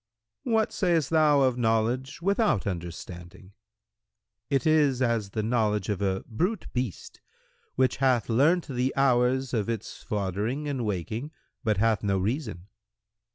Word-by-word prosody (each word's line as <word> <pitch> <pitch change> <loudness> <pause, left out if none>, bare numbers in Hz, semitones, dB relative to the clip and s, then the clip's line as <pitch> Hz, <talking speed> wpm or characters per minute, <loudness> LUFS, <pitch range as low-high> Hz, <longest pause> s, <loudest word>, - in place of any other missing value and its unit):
Q 240 - -3
"What 220 -1 +2
sayst 165 -6 +1
thou 155 -3 +4
of 130 -2 +2
knowledge 120 +6 0
without 200 - +2
understanding?"—"It 95 - -7
is 150 -5 +3
as 115 -5 0
the 110 +2 -3
knowledge 105 -3 0
of 100 -2 -2
a 95 -1 0
brute[FN#109] 180 - -3
beast, 125 - -4 0.5
which 130 0 +2
hath 130 -5 +2
learnt 150 +10 +3
the 130 -1 -1
hours 130 -1 +2
of 110 -2 0
its 115 -2 -5
foddering 105 +8 -2
and 135 -4 -2
waking, 110 - -3 0.3
but 110 -5 +1
hath 110 0 +2
no 100 -2 0
reason." 105 - -3
120 Hz, 135 wpm, -27 LUFS, 105-140 Hz, 0.5 s, thou